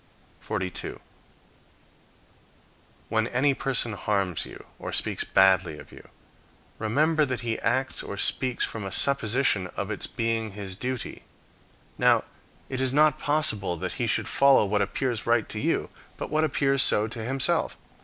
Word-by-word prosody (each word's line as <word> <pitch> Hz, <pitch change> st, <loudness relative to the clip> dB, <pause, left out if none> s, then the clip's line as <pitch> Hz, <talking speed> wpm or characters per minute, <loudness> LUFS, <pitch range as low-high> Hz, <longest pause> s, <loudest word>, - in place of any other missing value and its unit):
42. 90 Hz, -1 st, -4 dB, 2.1 s
When 110 Hz, 0 st, 0 dB
any 135 Hz, +4 st, +2 dB
person 130 Hz, -4 st, -1 dB
harms 100 Hz, -5 st, -1 dB
you, -, -, -12 dB
or -, -, -6 dB
speaks -, -, +1 dB
badly 95 Hz, -5 st, +3 dB
of 75 Hz, -, -13 dB
you, -, -, -14 dB, 0.7 s
remember 150 Hz, +9 st, +2 dB
that 130 Hz, -3 st, -2 dB
he 115 Hz, -2 st, -2 dB
acts 130 Hz, +3 st, 0 dB
or 100 Hz, -, -7 dB
speaks 125 Hz, +4 st, +2 dB
from 110 Hz, -, -6 dB
a 95 Hz, -, -5 dB
supposition 120 Hz, -5 st, +2 dB
of 100 Hz, +1 st, -3 dB
its -, -, -1 dB
being 115 Hz, -2 st, -2 dB
his 100 Hz, -2 st, -5 dB
duty. 125 Hz, +4 st, -5 dB, 0.8 s
Now, -, -, +4 dB, 0.4 s
it 130 Hz, -1 st, -4 dB
is 130 Hz, -1 st, +1 dB
not 150 Hz, +2 st, +3 dB
possible 110 Hz, -, +2 dB
that -, -, -4 dB
he -, -, +1 dB
should -, -, 0 dB
follow 140 Hz, -5 st, +5 dB
what 105 Hz, +1 st, 0 dB
appears 115 Hz, +3 st, -2 dB
right 115 Hz, -2 st, +2 dB
to 105 Hz, -, -4 dB
you, -, -, -1 dB, 0.3 s
but -, -, -6 dB
what 155 Hz, +1 st, +2 dB
appears 140 Hz, -2 st, +1 dB
so 105 Hz, -5 st, +3 dB
to 115 Hz, 0 st, -6 dB
himself. 135 Hz, +7 st, 0 dB
115 Hz, 150 wpm, -26 LUFS, 100-135 Hz, 2.1 s, follow